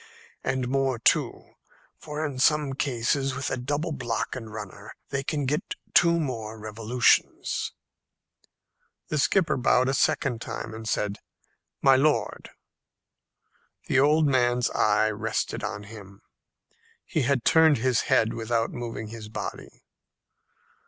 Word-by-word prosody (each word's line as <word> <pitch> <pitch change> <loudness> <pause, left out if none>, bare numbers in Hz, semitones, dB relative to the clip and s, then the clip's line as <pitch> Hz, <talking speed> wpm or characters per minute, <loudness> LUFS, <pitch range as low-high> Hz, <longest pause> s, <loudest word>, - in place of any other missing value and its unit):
And 130 -2 -1
more 135 -1 0
too. 115 - +1 0.5
For 150 0 -4
in 140 -4 -5
some 150 0 +3
cases, 135 +1 -1
with 135 0 -3
a - - +1
double 145 +6 -2
block 120 -6 -3
and 115 -4 -7
runner, 105 -1 -9
they 135 0 -2
can 145 0 -2
get 150 +4 -2 0.2
two 170 -1 +5
more 115 -7 -4
revolutions." 110 +3 +1 1.4
The 150 - 0
skipper 165 0 +2
bowed 125 0 +3
a - - +1
second 125 -3 +1
time, 115 - -6
and 110 0 -6
said, 105 -1 -1 0.6
"My 135 -1 +6
lord!" 150 +2 0 1.4
The 130 - +2
old 150 +3 +4
man's 125 -3 +2
eye 110 +1 +2
rested 110 +1 -3
on 105 - -4
him; 100 -1 -12 0.8
he 160 - -1
had 130 -1 0
turned 160 -2 +5
his 125 0 +1
head 110 0 +3
without 115 0 -1
moving 115 -3 -6
his 110 -1 -9
body. - - -7
125 Hz, 130 wpm, -26 LUFS, 110-140 Hz, 1.4 s, My